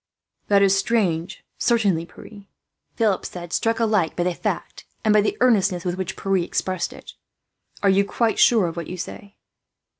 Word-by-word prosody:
"That 200 -1 +4
is 195 0 +4
strange, 195 -4 -1 0.2
certainly, 200 -9 +1
Pierre," 205 +1 -14 0.5
Philip 215 -5 +1
said, 175 -1 -7
struck 225 0 0
alike 210 -8 +1
by 175 - 0
the 180 0 0
fact - - -4 0.2
and 215 - +4
by 210 - +5
the 210 - -1
earnestness 195 -8 +2
with 175 - 0
which 185 -2 -5
Pierre 195 0 0
expressed 185 0 -2
it. - - -12 0.7
"Are 200 - +4
you 195 +1 +4
quite 225 +3 -1
sure 225 -6 +5
of 165 -1 -4
what 170 -2 -5
you 180 - -6
say?" 200 +2 -8
195 Hz, 175 wpm, -22 LUFS, 180-215 Hz, 0.7 s, by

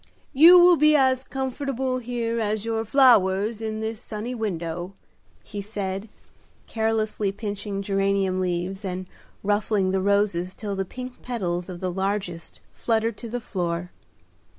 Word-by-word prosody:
You 330 +6 +9
will 350 -1 +7
be 305 0 +5
as 260 -2 +3
comfortable 265 -1 -2
here 235 -1 -2
as 215 -1 -1
your 225 -1 -1
flowers 220 -4 +4
in 220 -1 -3
this 220 +1 -4
sunny 220 +3 -5
window," 175 -5 -4 0.5
he 205 -2 -6
said, 200 0 -4 0.6
carelessly 220 -2 -1
pinching 205 -1 -4
geranium 195 -1 +1
leaves, 185 +2 -2
and 185 -1 -4 0.4
ruffling 205 -1 +1
the 190 0 +1
roses 195 -2 +1
till 205 -2 -4
the 195 0 -2
pink 250 +5 -8
petals 180 -7 -3
of 175 -1 -7
the 185 -1 -1
largest 190 -2 -3
fluttered 225 -1 0
to 235 - -7
the 245 +2 -3
floor. 175 -5 -3
210 Hz, 140 wpm, -24 LUFS, 190-230 Hz, 0.6 s, You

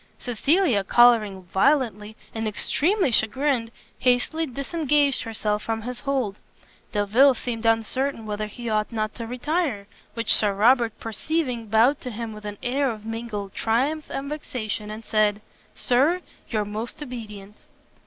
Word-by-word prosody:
Cecilia, 250 - +2
colouring 215 -4 +4
violently, 210 - +1 0.2
and 225 -1 -2
extremely 325 - +1
chagrined, 235 +2 +1 0.3
hastily 260 +6 +1
disengaged 285 +1 +1
herself 215 -2 -2
from 225 0 -3
his 250 +1 -5
hold. 260 -8 -1 0.5
Delvile 230 +7 +4
seemed 230 -1 -3
uncertain 225 +2 0
whether 215 0 -3
he 235 +2 -8
ought 215 0 0
not 215 -1 -2
to 230 -2 -6
retire, 255 - -1 0.3
which 230 0 +2
Sir 205 -2 +2
Robert 230 +2 +3
perceiving, 245 0 -2
bowed 230 +7 +3
to 255 - -5
him 230 -1 -5
with 210 0 -11
an 205 0 -5
air 270 +2 +1
of 215 -2 -6
mingled 225 -3 -5
triumph 275 +8 0
and 275 +1 -4
vexation, 220 -8 -4
and 215 +1 -7
said, 210 -1 +2 0.4
"Sir 285 +9 +2 0.3
your 215 -3 0
most 220 +7 -5
obedient!" 210 -6 -8
230 Hz, 140 wpm, -24 LUFS, 215-270 Hz, 0.5 s, colouring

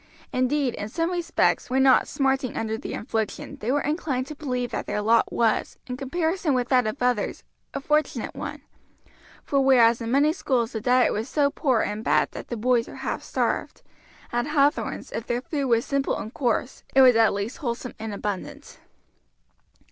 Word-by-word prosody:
Indeed, 255 0 +1
in 205 - -5
some 330 +7 -1
respects, 350 -6 +1
when 265 +1 +3
not 265 -1 +5
smarting 270 -3 0
under 220 0 -1
the 225 - -6
infliction, 220 -2 -3
they 230 - -2
were 290 +1 +2
inclined 290 -4 -1
to 305 - -8
believe 250 -4 -3
that - - -4
their - - -1
lot 225 +2 +3
was, 225 -2 0
in 250 - -5
comparison 320 +3 -1
with 245 -1 -1
that 250 -4 +3
of 215 +6 -4
others, 245 -4 0 0.3
a - - -1
fortunate 300 +2 0
one; - - -6 0.8
for 275 -1 +1
whereas 240 -3 +5
in 230 - -3
many 285 +5 +3
schools 250 -9 0
the 220 - -4
diet 250 +2 +3
was 220 +5 -3
so 285 0 +2
poor 265 -6 +1
and 210 +1 -3
bad - - +2
that - - -8
the 240 - -4
boys 240 +1 +2
were - - -10
half - - -2
starved, - - -2 0.5
at 240 +2 -1
Hathorn's 290 0 +1
if 225 - -5
their 240 +1 -1
food 280 -3 -2
was 230 -1 +2
simple 275 -1 0
and 220 - -7
coarse 250 0 -1
it 270 - +8
was 250 -2 +7
at 225 -1 +5
least 200 +5 -3
wholesome 250 -1 -4
and 220 0 -5
abundant. 200 -1 -6
250 Hz, 185 wpm, -25 LUFS, 230-280 Hz, 0.8 s, it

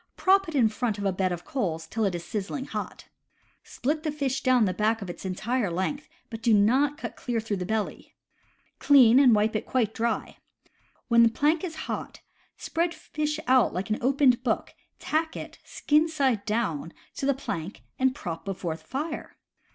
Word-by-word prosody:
Prop 390 0 +4
it 320 - -6
in 245 -5 +5
front 220 0 -2
of 200 - -4
a 195 - +2
bed 185 0 0
of 175 -1 -5
coals 165 - -2
till 220 +6 -1
it 190 -3 0
is 170 0 -6
sizzling 220 +6 -4
hot. - - -6 0.6
Split 300 +5 -2
the 310 -1 -2
fish 280 -3 -2
down 255 -4 +4
the 185 - 0
back 215 +4 +1
its 180 0 -8
entire 215 +4 -1
length, 190 - -3 0.2
but 225 -1 -6
do 225 -1 +4
not 260 +8 +3
cut - - -6
clear 240 -2 -2
through 215 -2 -3
the 180 -1 -4
belly. 220 0 -3 0.6
Clean, 260 -4 +7
and 255 -5 +6
wipe 215 +1 +1
it 215 - -2
quite 230 -5 0
dry. 230 0 -2 0.7
When 235 -1 +6
plank 300 +8 +1
is 335 -3 -4
hot, - - -5 0.4
spread 335 +1 -1
fish 300 0 -3
out 255 -6 +3
like 190 +4 -3
an 215 - 0
opened 260 -1 +3
book, 230 -4 -1 0.2
tack 320 +1 -1
it, - - -9
skin 305 +2 +1
side 265 -9 0
down, 205 -8 -2 0.2
to 270 - -1
the 280 - +3
plank 195 - -5 0.2
and 260 0 +2
prop 165 -10 -6
before 180 -4 -3
fire. 305 - -6
235 Hz, 180 wpm, -27 LUFS, 205-280 Hz, 0.7 s, Clean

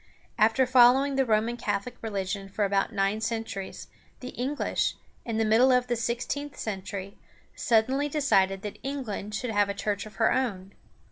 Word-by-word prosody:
After 225 +5 +4
following 260 +2 +5
the 270 -1 +2
Roman 225 +2 +1
Catholic 205 +1 -3
religion 195 -2 -3
for 205 +1 0
about 195 +2 +1
nine 200 +1 0
centuries, 225 -4 -4 0.3
the 250 - -7
English, 265 +5 -1 0.3
in 230 -2 -2
the 225 - +2
middle 230 +5 +5
of 250 -1 +3
the 245 -1 -1
sixteenth 245 +5 -3
century, 195 -1 -5 0.4
suddenly 260 +5 +2
decided 195 -10 +2
that 205 -2 -6
England 235 -7 -4
should 250 0 -3
have 205 -1 +2
a 200 - -2
church 205 0 -2
of 215 - -14
her 225 - +3
own. 200 -7 -2
225 Hz, 160 wpm, -27 LUFS, 200-250 Hz, 0.4 s, following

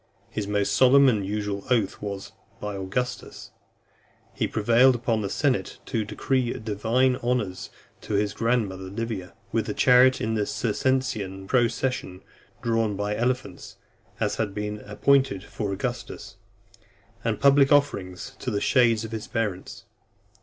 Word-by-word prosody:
His 105 -2 -3
most 100 -1 0
solemn 135 +2 +6
and 105 -5 0
usual 100 0 -3
oath 115 -6 +1
was, 100 -1 -5 0.3
"By 105 -1 -4
Augustus." 125 +7 -4 0.8
He - - -1
prevailed 120 +4 +4
upon 115 -2 0
the 100 - -3
senate 135 +2 0
to 115 -4 -1
decree 120 +4 -1
divine 115 +4 +1
honours 120 -7 -2 0.3
to 105 - -3
his 100 0 +1
grandmother 110 -5 -1
Livia, 100 -1 -5 0.2
with 110 -1 -1
a 105 - -3
chariot 125 +1 +5
in 110 +1 -1
the 105 -2 0
Circensian 110 -5 -1
procession 120 -4 -1 0.4
drawn 115 -3 +1
by 105 +1 -2
elephants, 125 +3 -3 0.4
as 105 -2 -1
had 105 -3 -2
been 105 0 -3
appointed 130 -2 +2
for 105 -2 -4
Augustus; 120 +5 -5 0.9
and - - -1
public 140 0 +5
offerings 100 -11 +1
to - - -3
the 100 - -1
shades 115 -2 +3
of 110 - -8
his 110 -1 -5
parents. 105 -5 -4
110 Hz, 140 wpm, -25 LUFS, 100-125 Hz, 0.9 s, solemn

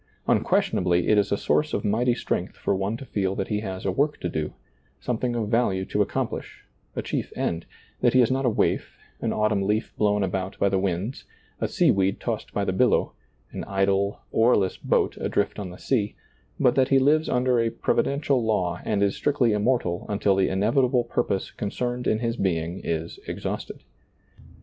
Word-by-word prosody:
Unquestionably, 90 -1 +2
it 105 - +5
is 100 - 0
a 100 - +2
source 150 +8 +1
of - - -2
mighty 120 +4 +2
strength - - -2
for - - 0
one 100 +3 -1
to 135 - -9
feel 95 -5 -1
that 95 - -3
he 105 - 0
has 95 -3 -5
a 95 - +2
work 145 +10 0
to - - -2
do, 80 -2 -3 0.5
something 120 0 -2
of 110 -3 -1
value 105 -5 +1
to - - 0
accomplish, - - -3 0.3
a - - -2
chief - - -3
end; 85 0 -2 0.3
that - - +3
he 130 - +5
is 120 - +1
not 135 +1 +1
a 125 - +3
waif, 110 - 0 0.2
an - - 0
autumn 105 -2 +1
leaf 105 +3 -1
blown 105 -1 +2
about 95 0 -3
by 100 - +2
the 95 0 +1
winds, 95 +5 -2 0.3
a - - 0
sea - - +3
weed 95 0 +1
tossed - - -3
by - - -1
the - - 0
billow, - - +2 0.4
an - - -5
idle, 100 +1 0
earless 110 -5 +3
boat - - 0
adrift 100 - -1
on 100 -3 -5
the 90 - -10
sea; 105 -6 -1 0.4
but 125 - +4
that 130 0 +2
he 135 - +5
lives 150 +4 +3
under 125 -1 +2
a 115 0 +2
provi 115 - +1
dential 140 -1 0
law 90 -6 0
and 100 -2 +1
is 100 - +1
strictly 140 -5 +2
immortal 105 -5 0
until 100 -1 +2
the 95 0 +2
in 95 0 -1
evitable 125 +1 +2
purpose 110 -5 -1
concerned 120 +4 -3
in 110 - +2
his 115 +1 -2
being 85 -1 -1
is 80 0 -3
ex - - -5
hausted. - - -4
105 Hz, 195 wpm, -25 LUFS, 95-120 Hz, 0.5 s, it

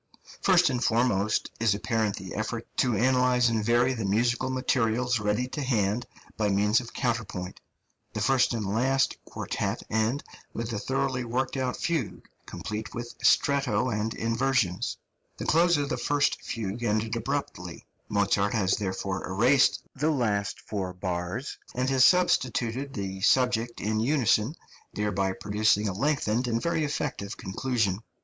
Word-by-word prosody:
First 180 -5 +4
and 125 -1 -1
foremost 110 -3 +1
is 110 -3 +3
apparent 110 -1 0
the 95 -2 -8
effort 110 +2 -3
to 125 -4 +2
analyse 125 +1 +3
and 110 -2 0
vary 120 +3 +3
the 115 -4 -4
musical 120 +6 +1
materials 125 -2 +1
ready 105 +4 0
to 145 - -4
hand 115 -3 0 0.3
by 105 -1 0
means 105 +3 +3
of 120 - -10
counterpoint. 115 -7 -3 0.5
The - - -3
first 130 -2 +3
and 110 -2 -2
last 130 +7 +1
quartet - - -3
end 110 +6 +1 0.3
with 115 0 -4
a 105 - -2
thoroughly 130 +1 -1
worked 125 +3 -2
out 130 -2 -1
fugue, 165 - -2 0.2
complete 105 0 -6
with 120 0 -5
stretto 140 -3 +3
and 105 +1 -1
inversions. 115 -5 0 0.4
The - - -5
close 170 +1 +4
of 145 -1 -1
the - - -1
first 145 +4 +1
fugue 110 0 -4
ended 110 0 0
abruptly; 115 -8 -4 0.2
Mozart 100 0 +1
has 95 -3 +2
therefore 95 -1 -3
erased 125 +9 +3
the 150 +3 +1
last 105 -9 0
four 95 -3 -4
bars, 90 +8 -4 0.2
and 130 +2 0
has 130 -2 +4
substituted 130 -5 +2
the 95 -1 -4
subject 120 0 +2
in 110 +1 -1
unison, 125 0 +2 0.4
thereby 100 -2 0
producing 105 +1 +1
a 100 - -1
lengthened 125 0 0
and 115 -1 0
very 165 +4 0
effective 140 -8 -3
conclusion. 105 -1 -1
115 Hz, 145 wpm, -27 LUFS, 105-130 Hz, 0.5 s, First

